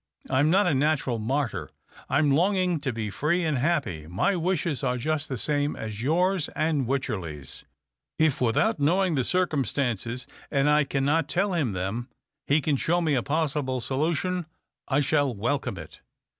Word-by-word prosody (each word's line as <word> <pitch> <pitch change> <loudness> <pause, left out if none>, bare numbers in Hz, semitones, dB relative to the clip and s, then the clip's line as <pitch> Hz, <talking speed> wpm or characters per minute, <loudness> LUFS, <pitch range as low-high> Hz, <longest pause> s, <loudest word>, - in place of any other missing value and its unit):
I'm 140 +3 +3
not 195 +5 +4
a 175 - +2
natural 135 -4 +1
martyr. 110 - -2 0.4
I'm 145 -1 +3
longing 180 +2 +2
to 140 -2 -2
he 110 -3 -4
free 170 - 0
and 150 -5 0
happy. 130 - -1
My 100 - +1
wishes 170 -4 -1
are 125 -1 0
just 155 +4 -2
the 130 - -2
same 145 +4 0
as 110 0 -6
yours 175 +5 +1
and 155 -5 0
Wycherley's. 95 - -4 0.5
If 155 -5 +2
without 130 - +2
knowing 180 +5 +2
the 135 -4 +1
cir 185 +7 +2
cumstances 125 - -2
— - - -21
and 140 0 +2
I 150 0 +4
cannot 140 +3 +1
tell 195 +2 +1
him 145 - 0
them 100 +7 -3 0.2
— 140 -1 -59
he 150 +2 +3
can 145 -1 +1
show 170 +6 +1
me 160 -4 +1
a 130 - +2
possible 145 -3 -1
solution, 155 +7 -1 0.4
I 145 +2 +2
shall 145 -3 +1
welcome 120 0 -1
it." 80 -2 -11
145 Hz, 170 wpm, -26 LUFS, 125-160 Hz, 0.5 s, not